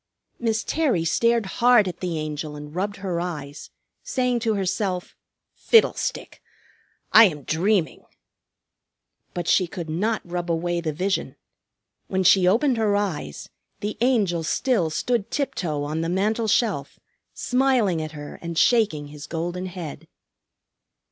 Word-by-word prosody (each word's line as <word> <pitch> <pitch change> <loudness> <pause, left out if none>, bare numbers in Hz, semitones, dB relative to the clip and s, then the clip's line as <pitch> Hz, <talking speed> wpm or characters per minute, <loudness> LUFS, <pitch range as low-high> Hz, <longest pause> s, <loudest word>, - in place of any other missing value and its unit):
Miss 225 -2 0
Terry 265 - 0
stared 230 +5 +2 0.2
hard 240 -4 +6
at 180 -1 -5
the 175 -3 -2
Angel 155 0 -4
and 150 0 -9
rubbed 200 +4 -2
her 185 -4 -3
eyes, 150 -5 -6 0.3
saying 250 -2 0
to 225 -2 0
herself, 190 -1 -2 0.4
"Fiddlestick! 455 -2 +1 0.7
I 225 +1 +10
am 150 -7 -2
dreaming!" 175 +3 0 1.3
But 175 -1 -3
she 185 +1 +3
could 170 -2 -6
not 215 +7 -1
rub 175 0 -4
away 170 +1 0
the 160 -2 -2
vision. 190 +6 -2 0.7
When 190 0 0
she 185 0 +5
opened 240 +6 +3
her 215 -2 +2
eyes 175 - -3 0.3
the 210 +1 -3
Angel 210 -9 +2
still 185 - +1
stood 230 +6 -1
tiptoe 165 - -2
on 155 +2 -2
the 165 - -2
mantel 215 +5 0
shelf, 200 - 0 0.4
smiling 250 -10 +1
at 155 0 -6
her 145 -1 -9
and 170 -1 -5
shaking 200 -13 +2
his 150 0 -10
golden 175 +3 -3
head. 165 -3 -8
180 Hz, 135 wpm, -24 LUFS, 160-220 Hz, 1.3 s, I